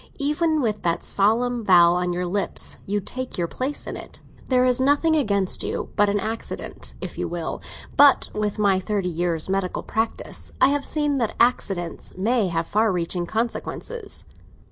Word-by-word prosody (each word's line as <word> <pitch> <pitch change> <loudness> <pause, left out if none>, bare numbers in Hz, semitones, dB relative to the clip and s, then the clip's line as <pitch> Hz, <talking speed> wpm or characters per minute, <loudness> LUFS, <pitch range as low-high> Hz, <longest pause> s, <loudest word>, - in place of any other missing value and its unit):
Even 305 +2 +1
with 215 -4 -1
that 170 -1 0
solemn 235 +4 +2
vow 175 -3 +6
on 180 0 0
your 180 +1 -1
lips, 195 +3 -1
you 205 +1 0
take 255 +5 -5
your 170 -1 0
place 265 - -3
in - - -5
it. - - -7 0.3
There 255 -1 +4
is 250 0 +3
nothing 290 +4 +3
against 200 -10 +1
you - - -3
but 205 0 +4
an 205 +1 +1
accident, 220 +3 -5
if - - -6
you - - -1
will; - - -4 0.3
but 285 -1 +6
with 210 0 -1
my 200 -3 +3
thirty 195 -1 -1
years' 170 -1 0
medical 190 -1 -1
practice, 225 +1 -3
I - - +6
have 285 0 0
seen 295 -2 0
that 230 -3 -1
accidents 190 -10 0
may 220 +2 +2
have 165 -1 -1
far 215 +3 +2
reaching 175 0 -1
consequences." 400 - -3
210 Hz, 170 wpm, -24 LUFS, 185-255 Hz, 0.3 s, vow